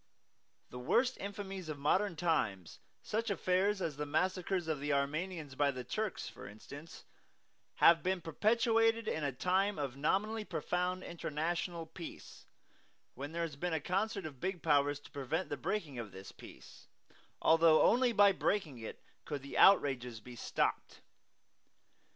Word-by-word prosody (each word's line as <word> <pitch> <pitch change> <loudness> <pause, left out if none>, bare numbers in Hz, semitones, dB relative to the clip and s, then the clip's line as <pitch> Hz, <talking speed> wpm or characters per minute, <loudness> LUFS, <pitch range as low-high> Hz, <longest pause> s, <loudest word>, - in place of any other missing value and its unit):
The 125 - -7
worst 250 - +2
infamies 195 -3 -6
of 150 - -4
modern 175 +6 +1
times 155 - -1 0.2
such 225 +2 -2
affairs 195 0 +1
as 150 -4 -3
the 150 - -2
massacres 180 +3 0
of 155 -3 -1
the 145 +1 -2
Armenians 150 +2 -2
by 145 +1 +2
the 130 -2 -4
Turks, 215 - -3
for - - -10
instance 140 +10 -11 0.7
have 165 0 +6
been 185 0 0
perpetrated 225 +6 +2
in 155 - -1
a 140 - 0
time 185 +8 +1
of 140 -4 -3
nominally 210 +10 0
profound 180 -2 -2
international 170 +1 -3
peace, 165 +1 -10 0.7
when 140 +4 -6
there 170 +1 -2
has 160 -4 -4
been 175 +4 -2
a 160 - +1
concert 195 +4 -1
of 140 -5 -8
big 185 -2 -3
Powers 145 -2 +3
to - - -15
prevent 145 +6 -2
the - - -2
breaking 150 -12 -3
of 110 -4 -6
this 95 0 -10
peace, - - -14 0.5
although 165 -1 +5
only 245 +1 +4
by 205 -2 +6
breaking 185 - -1
it 110 - -8 0.2
could 145 -3 -5
the 140 - -8
outrages 130 - +4
be 120 +3 -11
stopped. 115 - -2
165 Hz, 150 wpm, -34 LUFS, 145-195 Hz, 0.7 s, have